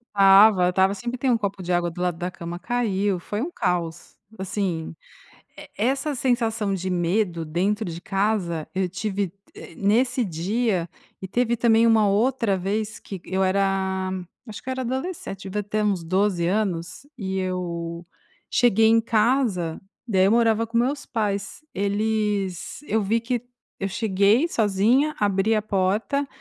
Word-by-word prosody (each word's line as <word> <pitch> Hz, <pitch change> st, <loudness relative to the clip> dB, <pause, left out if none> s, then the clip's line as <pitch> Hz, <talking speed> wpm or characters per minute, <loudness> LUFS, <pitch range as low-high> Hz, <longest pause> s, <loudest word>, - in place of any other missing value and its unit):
Estava, 195 Hz, 0 st, +7 dB
eu -, -, +3 dB
estava, 190 Hz, +2 st, +3 dB
sempre 240 Hz, +3 st, -4 dB
tem 265 Hz, -, +1 dB
um 235 Hz, -, +4 dB
copo 200 Hz, -2 st, -3 dB
de 180 Hz, 0 st, -4 dB
água 175 Hz, -1 st, +1 dB
do 180 Hz, -, -7 dB
lado 175 Hz, -2 st, 0 dB
da 180 Hz, +1 st, -3 dB
cama, 170 Hz, 0 st, -7 dB
caiu, 200 Hz, -2 st, 0 dB
foi 205 Hz, +5 st, -4 dB
um 345 Hz, -, -4 dB
caos, 170 Hz, -, -3 dB, 0.2 s
assim, 190 Hz, -4 st, -3 dB, 0.6 s
e -, -, -10 dB
essa 270 Hz, +6 st, 0 dB
sensação 225 Hz, -5 st, 0 dB
de 190 Hz, 0 st, -3 dB
medo 175 Hz, 0 st, 0 dB
dentro 190 Hz, +7 st, 0 dB
de 170 Hz, -1 st, -5 dB
casa, 195 Hz, -5 st, -1 dB
eu 185 Hz, -1 st, +1 dB
tive, 195 Hz, 0 st, -3 dB, 0.2 s
eh, -, -, -11 dB
nesse 245 Hz, +5 st, +2 dB
dia 185 Hz, +1 st, -1 dB, 0.3 s
e 190 Hz, -, -5 dB
teve 240 Hz, +3 st, 0 dB
também 230 Hz, 0 st, +4 dB
uma 220 Hz, -2 st, +4 dB
outra 220 Hz, 0 st, +2 dB
vez 210 Hz, +3 st, -2 dB
que 195 Hz, -, -8 dB
eu 190 Hz, 0 st, 0 dB
era 190 Hz, -1 st, 0 dB, 0.4 s
acho 215 Hz, -1 st, -9 dB
que 260 Hz, -, -6 dB
era 260 Hz, 0 st, -2 dB
adolescente, 260 Hz, -, -4 dB
deveria 210 Hz, +2 st, -2 dB
ter 215 Hz, 0 st, 0 dB
uns 195 Hz, -5 st, 0 dB
12 185 Hz, 0 st, +1 dB
anos 185 Hz, +1 st, -2 dB
e 190 Hz, -3 st, -3 dB
eu 170 Hz, -2 st, -4 dB, 0.5 s
cheguei 225 Hz, -2 st, +4 dB
em 225 Hz, 0 st, +5 dB
casa, 220 Hz, -7 st, +1 dB, 0.3 s
daí 190 Hz, -4 st, +3 dB
eu 195 Hz, -, +4 dB
morava 230 Hz, -1 st, +3 dB
com 230 Hz, +1 st, -2 dB
meus 275 Hz, +4 st, 0 dB
pais, 210 Hz, 0 st, -2 dB
eles 205 Hz, -, -1 dB
eu 220 Hz, 0 st, +1 dB
vi 220 Hz, +4 st, +1 dB
que 240 Hz, +1 st, -2 dB, 0.4 s
eu 195 Hz, -, -1 dB
cheguei 205 Hz, -, +2 dB
sozinha, 235 Hz, -, +2 dB
abri 205 Hz, +2 st, +2 dB
a 215 Hz, -, +1 dB
porta 210 Hz, +8 st, 0 dB
200 Hz, 160 wpm, -24 LUFS, 185-225 Hz, 0.6 s, Estava